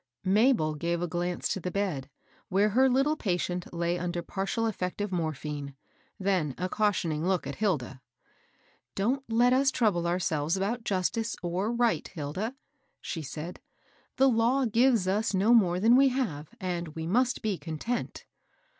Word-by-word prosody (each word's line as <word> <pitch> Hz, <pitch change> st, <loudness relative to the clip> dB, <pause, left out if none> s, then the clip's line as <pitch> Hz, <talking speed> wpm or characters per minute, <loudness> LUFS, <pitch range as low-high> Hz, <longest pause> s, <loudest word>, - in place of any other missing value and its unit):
Mabel 200 Hz, -, +3 dB
gave 170 Hz, +3 st, -1 dB
a -, -, -1 dB
glance 175 Hz, +1 st, -2 dB
to -, -, -1 dB
the 180 Hz, -, -3 dB
bed, 180 Hz, -9 st, -2 dB, 0.4 s
where 200 Hz, +3 st, +3 dB
her 260 Hz, +5 st, +4 dB
little 270 Hz, +4 st, +2 dB
patient 180 Hz, -, -2 dB
lay 170 Hz, +1 st, -1 dB
under 175 Hz, 0 st, -3 dB
partial 195 Hz, +6 st, -2 dB
effect 185 Hz, -4 st, -3 dB
of 205 Hz, -1 st, -2 dB
morphine, 150 Hz, -4 st, -3 dB, 0.4 s
then 185 Hz, -8 st, 0 dB
a 180 Hz, -, -1 dB
cautioning 180 Hz, -6 st, 0 dB
look 185 Hz, -5 st, +1 dB
at 140 Hz, -, -5 dB
Hilda. 140 Hz, -, -1 dB, 0.5 s
" 120 Hz, -, -37 dB
Don't 250 Hz, +8 st, 0 dB
let 240 Hz, +2 st, +4 dB
us 270 Hz, +1 st, +4 dB
trouble 195 Hz, -10 st, +1 dB
ourselves 170 Hz, -2 st, 0 dB
about 220 Hz, +5 st, -2 dB
justice 220 Hz, +4 st, -1 dB
or 180 Hz, +5 st, -1 dB
right, 240 Hz, -1 st, +1 dB
Hilda," 180 Hz, -, -4 dB, 0.4 s
she 165 Hz, -, -5 dB
said. 155 Hz, +4 st, -7 dB, 0.3 s
" -, -, -36 dB
The 270 Hz, -, +5 dB
law 250 Hz, +2 st, +3 dB
gives 230 Hz, -3 st, +3 dB
us 205 Hz, +2 st, +1 dB
no 205 Hz, +5 st, +4 dB
more 180 Hz, -6 st, +4 dB
than 225 Hz, +5 st, +5 dB
we 270 Hz, +1 st, +6 dB
have, 205 Hz, -, -2 dB
and 175 Hz, -4 st, -4 dB
we 160 Hz, 0 st, -4 dB
must 250 Hz, +8 st, +1 dB
be 210 Hz, -5 st, -1 dB
content." 160 Hz, +10 st, -4 dB
185 Hz, 165 wpm, -28 LUFS, 170-230 Hz, 0.5 s, we